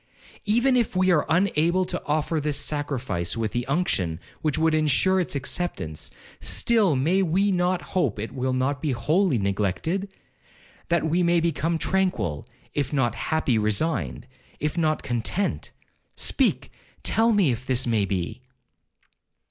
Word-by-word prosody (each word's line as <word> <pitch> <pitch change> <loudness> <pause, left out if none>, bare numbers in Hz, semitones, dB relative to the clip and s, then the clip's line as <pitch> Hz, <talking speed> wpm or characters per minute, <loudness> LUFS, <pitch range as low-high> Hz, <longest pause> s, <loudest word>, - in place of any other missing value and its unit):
Even 240 +5 +3
if 235 -6 +1
we 185 0 +3
are 155 -4 +2
unable 180 0 +2
to - - -4
offer 155 +2 0
this 150 -1 -1
sacrifice 135 - -2
with 110 -2 -1
the 120 +1 -2
unction 115 - 0 0.2
which 155 -3 0
would 160 0 +2
ensure 155 +5 +3
its 175 - -2
acceptance, 140 - -3 0.3
still 215 -9 +2
may 165 +9 +2
we 190 +3 +2
not 180 0 +1
hope 145 - +1
it 110 +2 -5
will 130 0 -2
not 130 +2 0
be 150 -4 0
wholly 155 +5 +2
neglected?—that 160 - -3
we 165 +3 +1
may 170 0 +3
become 165 0 0
tranquil, 140 - -1 0.2
if 145 -2 -1
not 130 -5 +1
happy—resigned, 110 - 0 0.3
if 150 +2 -2
not 155 -3 0
content. 125 - -2 0.5
Speak, - - 0 0.3
tell 225 +1 +3
me 200 - +3
if 120 +2 -5
this 130 0 +2
may 110 -4 +1
be?' 95 +4 -3
155 Hz, 140 wpm, -25 LUFS, 120-180 Hz, 0.5 s, Even